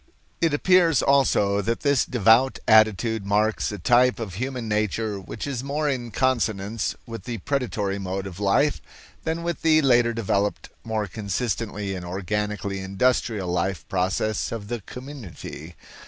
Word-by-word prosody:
It 165 -2 +3
appears 170 +1 +4
also 105 -8 +3
that 115 +4 -2
this 140 -3 +2
devout 120 +2 +4
attitude 110 0 +4
marks 105 +3 +1
a 105 - -5
type 125 +3 +3
of 110 -6 -5
human 125 +3 -4
nature 105 0 -1
which 95 - -7
is 135 -3 -3
more 150 +2 -1
in 125 -4 -2
consonance 110 -3 0
with 115 -5 -8
the 120 -2 -4
predatory 105 -5 -2
mode 95 0 -3
of 95 -1 -8
life 130 +9 +2 0.4
than 165 +1 -2
with 170 0 -3
the 160 -1 +5
later 120 -3 +4
developed, 105 -3 -1
more 110 -2 -2
consistently 105 0 -3
and 90 -1 -5
organically 100 +2 -3
industrial 100 0 0
life 90 -1 -2
process 95 +3 0
of 110 -3 -6
the 120 -2 -3
community. 110 - -9
110 Hz, 145 wpm, -24 LUFS, 100-130 Hz, 0.4 s, the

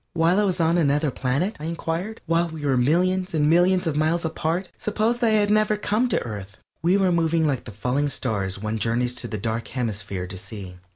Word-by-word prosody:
"While 170 +4 +3
I - - +3
was 185 -3 0
on 165 +1 +3
another 145 -1 +2
planet?" 135 - -1
I 150 - -6
inquired. 170 +6 -3
"While 165 +1 +2
we 160 -2 -6
were 135 -2 +2
millions 180 +8 +1
and 150 -1 +3
millions 180 +3 +4
of 160 -3 -1
miles 160 +3 +1
apart? 165 +3 -1
Suppose 220 +3 0
that 240 - +2
I 215 -1 +4
had 205 0 +2
never 215 0 +3
come 215 +4 0
to - - +2
Earth?" 100 -4 -7 0.2
We 180 +4 +3
were 190 -2 +2
moving 165 -1 +2
like 135 -5 -1
the 115 - -8
falling 125 +8 -1
stars 100 -8 -2
one 110 +2 -3
journeys 120 +2 0
to 125 -1 -5
the 110 - -4
Dark 115 +3 -3
Hemisphere 105 -6 -3
to 95 +1 -7
see. 95 -2 -8
160 Hz, 220 wpm, -24 LUFS, 120-180 Hz, 0.2 s, millions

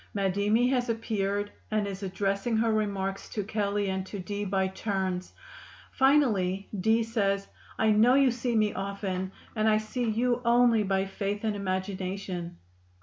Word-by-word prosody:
Madimi 200 +4 +2
has 250 -2 0
appeared 205 -2 -1 0.2
and 215 -1 0
is 195 -1 -5
addressing 195 +3 -1
her 225 0 +2
remarks 195 -2 -2
to 210 - -3
Kelley 205 -1 -1
and 190 0 -2
to 205 - -6
Dee 205 +2 -4
by 190 -1 +1
turns; 190 -2 -2 0.6
finally, 220 -10 +2
Dee 220 +4 +3
says, 200 -3 0 0.3
"I 220 -1 +3
know 225 +4 +5
you 275 -2 +5
see 240 0 -2
me 215 -1 +2
often 195 -1 -3 0.2
and 215 0 +2
I 215 - +4
see 225 +2 -2
you 240 +2 +1
only 235 -1 +4
by 195 -1 +1
faith 200 +1 -3
and 215 -2 0
imagination." 185 -2 -3
205 Hz, 150 wpm, -28 LUFS, 195-225 Hz, 0.6 s, know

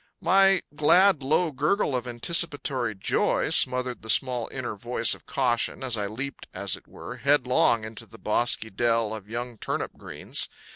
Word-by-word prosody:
My 195 +1 +3
glad 175 +2 +4
low 155 +5 +1
gurgle 150 +2 0
of 125 0 -3
anticipatory 130 -2 +1
joy 95 - 0
smothered 125 -1 +2
the 110 - -10
small 125 -1 +2
inner 120 -4 -5
voice 120 +4 +1
of - - -12
caution 125 -1 -1
as 125 -3 +2
I 105 -2 -2
leaped, 130 +7 -7
as 95 -1 +1
it - - -17
were, - - -10
headlong 125 -5 +2
into 110 0 -8
that 115 - -17
bosky 110 0 +1
dell 115 -2 +1
of 105 -2 -9
young 120 0 -6
turnip - - -3
greens. - - -2
125 Hz, 160 wpm, -25 LUFS, 115-145 Hz, -, glad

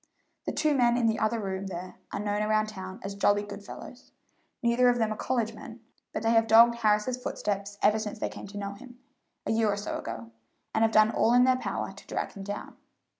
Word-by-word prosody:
The - - +1
two 305 0 +1
men 240 -3 +3
in 240 - +1
the 225 0 +2
other 220 +2 +1
room 195 -1 -3
there 185 0 -7
are - - -3
known 205 0 -1
around 215 0 +1
town 190 -2 -8
as 200 - -4
jolly 205 +1 +2
good 205 0 -8
fellows; 250 +4 -11 0.5
neither 240 +1 +4
of 245 - +2
them 220 -2 +1
are - - -8
college 230 -1 -1
men, 230 +1 -10 0.3
but - - -4
they 225 - +3
have 225 -1 +4
dogged 230 +2 +7
Harris's 220 +3 +1
footsteps 200 -3 -3
ever 210 +1 +4
since 215 0 -4
they - - -2
came - - -9
to 205 +1 -9
know 200 0 -4
him, 245 +3 -13 0.5
a - - 0
year 220 -1 +2
or 200 - -2
so 205 - -4
ago, 115 0 -7 0.4
and 220 - +1
have 225 0 +4
done 215 0 +5
all 230 - +3
in 245 - +7
their 255 0 +5
power 255 - -3
to - - -15
drag - - -3
him 200 - -10
down. 205 +1 -6
215 Hz, 230 wpm, -28 LUFS, 200-235 Hz, 0.5 s, dogged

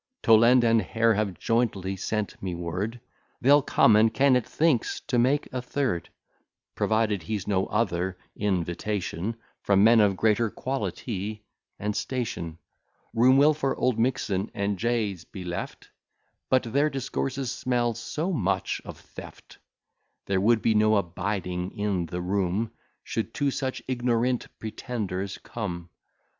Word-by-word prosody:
Toland 115 +3 +6
and 115 -1 +4
Hare 115 +3 +2
have 100 -3 -1
jointly 105 -5 0
sent 105 +2 -3
me 90 -2 -3
word 90 +7 -3 0.4
They'll 145 +3 +6
come; 115 -4 +4
and 110 +1 +5
Kennet 130 -3 +3
thinks 155 -7 +1
to 125 -5 0
make 135 +4 +2
a 130 - -2
third, 125 - -2 0.6
Provided 110 -3 +1
he's 100 +3 -4
no 95 -2 +1
other 95 -4 -1 0.2
invitation 95 +1 -2 0.3
From 100 -1 +3
men 115 +1 +7
of 100 -3 +3
greater 110 +2 +2
quality 110 -5 -4 0.3
and 105 0 -2
station. 105 -10 -3 0.6
Room 125 +3 +5
will 145 +2 +6
for 140 -3 -1
Oldmixon 115 -5 0
and 100 -1 -1
J 115 -3 0
s 85 -3 -13
be 95 - -9
left: 85 -1 -6 0.6
But 130 -1 +3
their 140 +6 +1
discourses 135 -1 -3
smell 120 -3 0
so 155 - -3
much 100 - -1
of - - -9
theft, - - -13 0.7
There 95 -1 +1
would 110 +2 +3
be 115 - +3
no 110 0 +4
abiding 90 -1 -2
in 100 -4 -1
the 90 +2 -4
room, 100 +4 -1 0.3
Should 115 - -4
two 145 -2 +1
such 130 -1 -3
ignorant 125 -1 0
pretenders 100 -4 -4
come. 90 -7 -6
110 Hz, 135 wpm, -26 LUFS, 95-125 Hz, 0.7 s, men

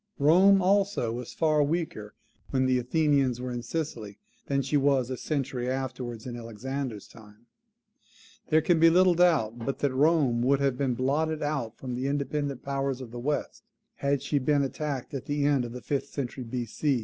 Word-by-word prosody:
Rome, 185 +6 +5
also, 195 - +2
was 120 0 -6
far 155 -2 +2
weaker 145 -9 -2 0.3
when 130 -1 +1
the 130 -1 +2
Athenians 135 -1 +1
were 125 0 -4
in 120 0 -3
Sicily, 120 -7 -5 0.3
than 140 -1 0
she 140 +3 -2
was 135 -3 +2
a - - -1
century 130 -3 -2
afterwards, 125 -3 -4
in 125 -2 -5
Alexander's 120 0 -5
time. 110 0 -17 1.0
There 155 +1 +4
can 170 0 +3
be 165 +1 +7
little 180 +2 +5
doubt 160 -10 +2
but 135 +4 -3
that 140 -2 0
Rome 140 -4 +3
would 135 +3 +3
have 140 -2 +1
been 130 -2 0
blotted 150 +5 0
out 135 -7 -2
from 130 -2 -6
the 130 +2 -2
independent 140 -1 -2
powers 135 -1 -2
of 125 -3 -9
the 120 - -6
West, 145 +4 -2 0.4
had 140 -1 0
she 145 0 0
been 140 +2 +2
attacked 140 -1 -4
at 135 -2 -5
the 145 -1 -1
end 140 -4 +2
of 120 - -7
the 125 +1 -7
fifth 140 -2 -2
century 130 -2 -5
B.C. 125 +3 -1
135 Hz, 185 wpm, -28 LUFS, 125-150 Hz, 1.0 s, be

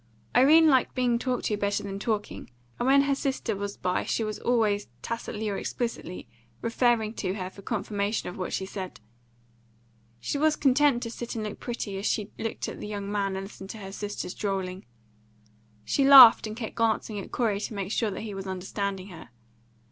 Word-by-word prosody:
Irene 300 +6 +7
liked 265 -4 +3
being 245 -2 +2
talked 250 0 -2
to 210 - 0
better 205 0 -1
than 195 -1 -5
talking, 210 -1 -3 0.3
and 245 - 0
when 275 +1 +6
her 280 0 +1
sister 265 -5 -2
was 200 0 -5
by 180 0 0
she 225 - -1
was 215 -1 -4
always, 215 -4 +1 0.2
tacitly 220 -2 -4
or 200 -2 -2
explicitly, 230 - -4 0.3
referring 230 -2 +1
to 190 -4 -3
her 185 -2 -5
for 200 - -13
confirmation 205 +2 -2
of 180 - -6
what 185 - -4
she 190 - -2
said. 190 -1 -7 1.2
She 280 - -2
was 310 +1 +3
content 275 -2 +3
to 230 - -4
sit 240 0 -6
and 220 - -3
look 210 -1 -5
pretty 215 -5 -4
as 200 - -1
she 210 -1 -1
looked 225 - -3
at - - -7
the - - -6
young 205 -1 -4
man 200 -2 -1
and 190 - -4
listened 195 -1 -11
to 220 - -7
her 195 -2 -8
sister's 205 -2 -5
drolling. 190 -2 -3 1.0
She 275 - +1
laughed 270 -5 +10
and 215 +1 -7
kept 225 -3 -5
glancing 220 -2 0
at 195 - -8
Corey 220 -5 0
to 215 - -5
make 195 -1 -3
sure 225 -1 +1
that 195 - -5
he 215 -2 -6
was 195 0 -6
understanding 195 +1 -4
her. 165 -8 -11
210 Hz, 195 wpm, -27 LUFS, 195-240 Hz, 1.2 s, laughed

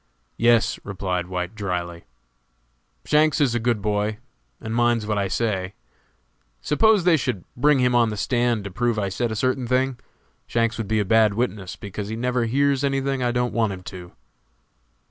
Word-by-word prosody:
"Yes," 115 -1 +3
replied 90 -3 -3
White, 90 0 -4
dryly, 90 -5 -4 1.0
"Shanks 155 0 +3
is 135 -5 +2
a 120 - 0
good 115 -3 0
boy, 105 0 0 0.4
and 110 - -5
minds 120 -2 +2
what 105 -1 -1
I 100 - 0
say. 95 -2 -2 0.8
Suppose 210 +6 +3
they 175 -1 +5
should 100 - -3
bring 145 +3 +3
him 125 -1 +2
on 120 -2 +4
the 105 - -5
stand 120 -1 0
to 100 - -6
prove 120 +4 0
I 100 -2 -1
said 110 +5 -2
a - - -3
certain 130 +2 0
thing, 130 0 0 0.5
Shanks 115 0 0
would 110 - -3
be 110 +1 +1
a 105 - 0
bad 110 0 +4
witness, 105 -6 -2
because 100 0 -6
he 110 - -4
never 125 +1 0
hears 140 +3 +1
any 135 -1 +1
thing 135 -1 -2
I 120 -1 +1
don't 125 0 -1
want 110 -4 +1
him 90 -1 -9
to." 90 -1 -10
115 Hz, 185 wpm, -23 LUFS, 100-125 Hz, 1.0 s, they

